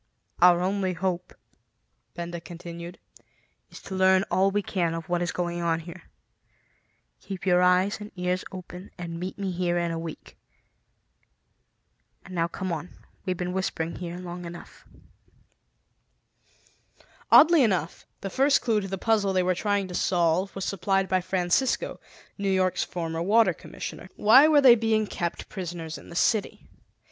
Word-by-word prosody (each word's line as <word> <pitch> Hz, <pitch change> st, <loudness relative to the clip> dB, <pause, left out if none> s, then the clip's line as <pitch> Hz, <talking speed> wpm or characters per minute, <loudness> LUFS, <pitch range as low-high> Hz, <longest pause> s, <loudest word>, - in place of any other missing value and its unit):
"Our 175 Hz, 0 st, +6 dB
only 190 Hz, 0 st, 0 dB
hope," 180 Hz, 0 st, -3 dB, 0.8 s
Benda 170 Hz, 0 st, -5 dB
continued, 170 Hz, +1 st, -9 dB, 0.7 s
"is -, -, -11 dB
to 195 Hz, -, -8 dB
learn 190 Hz, 0 st, +4 dB
all 190 Hz, +1 st, +3 dB
we 205 Hz, +1 st, -1 dB
can 170 Hz, -4 st, -1 dB
of 165 Hz, -1 st, -6 dB
what 175 Hz, 0 st, 0 dB
is 175 Hz, -, -1 dB
going 175 Hz, -1 st, -3 dB
on 165 Hz, -1 st, 0 dB
here. 170 Hz, +2 st, -11 dB, 1.1 s
Keep 195 Hz, -2 st, -7 dB
your 180 Hz, -1 st, +4 dB
eyes 180 Hz, +3 st, +3 dB
and 210 Hz, -, -8 dB
ears 180 Hz, 0 st, -1 dB
open 185 Hz, 0 st, -9 dB
and 170 Hz, -2 st, -6 dB
meet 185 Hz, +2 st, -5 dB
me 195 Hz, -2 st, -3 dB
here 175 Hz, -1 st, 0 dB
in 170 Hz, -1 st, 0 dB
a 165 Hz, -, -3 dB
week. 165 Hz, -1 st, -9 dB, 1.9 s
And 185 Hz, -, -11 dB
now 170 Hz, -1 st, +1 dB
come 185 Hz, +2 st, -5 dB
on; 165 Hz, +1 st, -4 dB, 0.4 s
we've 185 Hz, -2 st, -1 dB
been 180 Hz, 0 st, -3 dB
whispering 170 Hz, -3 st, -2 dB
here 175 Hz, -1 st, -6 dB
long 180 Hz, 0 st, -7 dB
enough." 170 Hz, 0 st, -11 dB, 2.4 s
Oddly 330 Hz, -1 st, +8 dB
enough, 185 Hz, -, 0 dB
the 195 Hz, -, -5 dB
first 275 Hz, +5 st, +3 dB
clue 220 Hz, -3 st, +1 dB
to 195 Hz, -, -5 dB
the 195 Hz, 0 st, -4 dB
puzzle 205 Hz, -1 st, +1 dB
they 185 Hz, -1 st, +2 dB
were 185 Hz, 0 st, +2 dB
trying 200 Hz, +1 st, -1 dB
to -, -, -7 dB
solve 175 Hz, +1 st, +1 dB
was 195 Hz, -, -3 dB
supplied 195 Hz, 0 st, 0 dB
by 185 Hz, 0 st, +2 dB
Francisco, 180 Hz, +8 st, 0 dB, 0.4 s
New 200 Hz, -1 st, 0 dB
York's 185 Hz, -1 st, +1 dB
former 165 Hz, -2 st, -4 dB
Water 205 Hz, +1 st, +4 dB
Commissioner. 185 Hz, -, -8 dB
Why 260 Hz, +8 st, +7 dB
were 300 Hz, -2 st, +5 dB
they 260 Hz, -3 st, +9 dB
being 220 Hz, -2 st, +1 dB
kept 170 Hz, -4 st, -4 dB
prisoners 170 Hz, -4 st, -6 dB
in -, -, -15 dB
the 170 Hz, -, -10 dB
city? 210 Hz, +3 st, 0 dB
180 Hz, 155 wpm, -26 LUFS, 175-195 Hz, 2.4 s, they